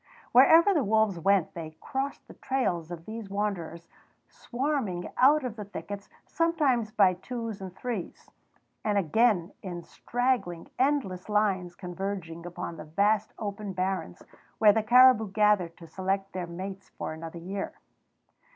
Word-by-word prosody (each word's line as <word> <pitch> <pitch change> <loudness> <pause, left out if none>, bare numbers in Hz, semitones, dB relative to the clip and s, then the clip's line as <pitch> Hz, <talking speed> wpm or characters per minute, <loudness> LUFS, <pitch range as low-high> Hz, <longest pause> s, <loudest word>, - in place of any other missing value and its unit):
Wherever 325 +10 +7
the 305 -6 +2
wolves 215 -3 +2
went 195 0 +2
they 160 -2 -8
crossed 270 +1 -4
the - - -12
trails 180 -12 -1
of 170 -1 -8
these 220 -2 -7
wanderers 180 -5 -3 0.4
swarming 245 -9 -2
out 290 +3 +5
of 245 -4 -4
the 210 - -4
thickets, 200 0 -7 0.2
sometimes 295 -9 +1
by 200 -4 +4
twos 225 +2 -6
and 190 -1 -8
threes, 225 -5 -6 0.5
and 210 -1 +1
again 195 0 +2
in 175 -3 -6
straggling, 245 -9 -2
endless 255 -10 0
lines 195 -4 +1
converging 180 -2 -5
upon 170 -1 -6
the 155 - -8
vast 205 +6 +1
open 205 -1 -5
barrens 185 - -3 0.3
where 210 -2 +6
the 220 - +2
caribou 240 -1 +6
gathered 205 -5 +2
to 170 - -12
select 190 +3 -2
their 180 -2 -4
mates 190 +3 -7
for - - -5
another 165 +1 -8
year. 190 +4 -5
200 Hz, 140 wpm, -28 LUFS, 175-230 Hz, 0.5 s, Wherever